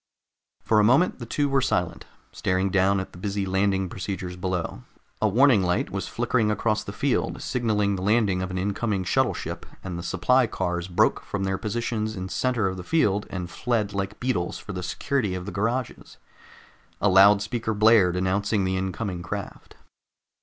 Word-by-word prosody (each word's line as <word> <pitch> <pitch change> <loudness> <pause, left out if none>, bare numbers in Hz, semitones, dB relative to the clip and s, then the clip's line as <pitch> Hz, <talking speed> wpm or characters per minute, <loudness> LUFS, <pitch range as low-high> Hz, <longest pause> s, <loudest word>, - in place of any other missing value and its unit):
For 110 - +3
a - - +5
moment 135 +12 +3
the 120 - -7
two 145 +4 0
were 135 -1 +2
silent, 90 -7 -1 0.3
staring 95 +1 0
down 95 +1 +3
at 95 - -6
the 90 - -13
busy 100 0 -2
landing 95 0 +1
procedures 90 0 -5
below. 90 -7 -3 0.4
A 110 - +4
warning 120 0 +5
light 90 -1 0
was 95 -1 -3
flickering 120 -2 0
across 105 0 0
the 100 - -6
field, 130 +6 -1
signaling 105 -5 0
the - - -5
landing 100 -2 +2
of 95 - -3
an 95 - -4
incoming 100 +1 -1
shuttle 90 - +1
ship, - - -6 0.2
and 90 -2 -5
the - - -4
supply 115 +9 +2
cars 90 -4 -2
broke 90 - +2
from 100 -1 -4
their 95 0 -1
positions 110 0 -2
in 95 0 -5
center 125 0 0
of 95 0 -3
the 90 - -6
field 105 - +1
and 90 -2 -5
fled 115 -4 -1
like 100 +1 -3
beetles 105 -9 -1
for 105 - -8
the 90 - -4
security 105 +1 -1
of 90 -1 -5
the 105 - -5
garages. 115 +5 -3 0.8
A - - +2
loudspeaker 105 +4 +4
blared, 105 -4 +5
announcing 100 +3 0
the 95 0 0
incoming 95 0 -3
craft. 100 +3 -7
100 Hz, 180 wpm, -25 LUFS, 95-110 Hz, 0.8 s, a